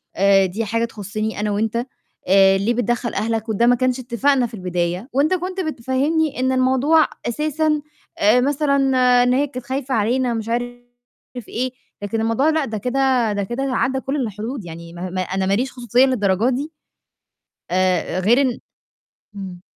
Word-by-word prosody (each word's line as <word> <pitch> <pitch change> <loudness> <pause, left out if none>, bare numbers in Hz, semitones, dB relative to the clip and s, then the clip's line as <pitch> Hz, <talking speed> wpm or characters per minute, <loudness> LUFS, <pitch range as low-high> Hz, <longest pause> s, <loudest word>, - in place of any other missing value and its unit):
آآ 195 0 +4
دي 215 +5 -3
حاجة 230 +3 0
تخُصّني 215 -1 -5
أنا 210 0 -1
و 200 - -1
أنت 220 0 -1 0.5
آآ 195 0 +5
ليه 210 +5 0
بتدخل 240 0 -1
أهلك 225 +2 -2
وده 220 +2 +2
ما 245 - +5
كانش 255 +1 0
إتفاقنا 255 +1 +1
في 230 - -19
البداية 180 +3 -3
وأنت 285 +6 +2
كنت 370 +1 -3
بتفهّمني 290 +1 -1
إن 260 +1 +1
الموضوع 265 +5 +3 0.2
أساسًا 305 +4 0 0.4
آآ 220 +5 +4
مثلًا 280 +1 +1 0.5
إن 250 - +2
هي 280 +3 +2
كانت 255 -3 -8
خايفة 265 0 -2
علينا 240 +3 +1
ومش 225 -1 -3
عارف 245 +1 -2 0.7
إيه، 255 +2 -2 0.3
لكن 220 +2 -2
الموضوع 230 +7 +2
لأ، 315 -2 +1
ده 220 -3 -4
كده 250 0 +1
ده 200 0 -1
كده 240 +7 -3
عدّى 265 0 0
كل 270 +2 -3
الحدود، 225 -2 -4
يعني 170 0 -9 0.4
أنا 190 0 0
ما 195 - +1
ليش 250 +5 0
خصوصية 245 +1 +2
للدرجة 215 -3 +1
دي؟! 275 +5 -3 1.0
آآ 185 -1 +1
غير 230 +8 +4
إن 255 -3 0 0.8
إمم. 185 -3 -8
240 Hz, 165 wpm, -20 LUFS, 210-265 Hz, 1.0 s, آآ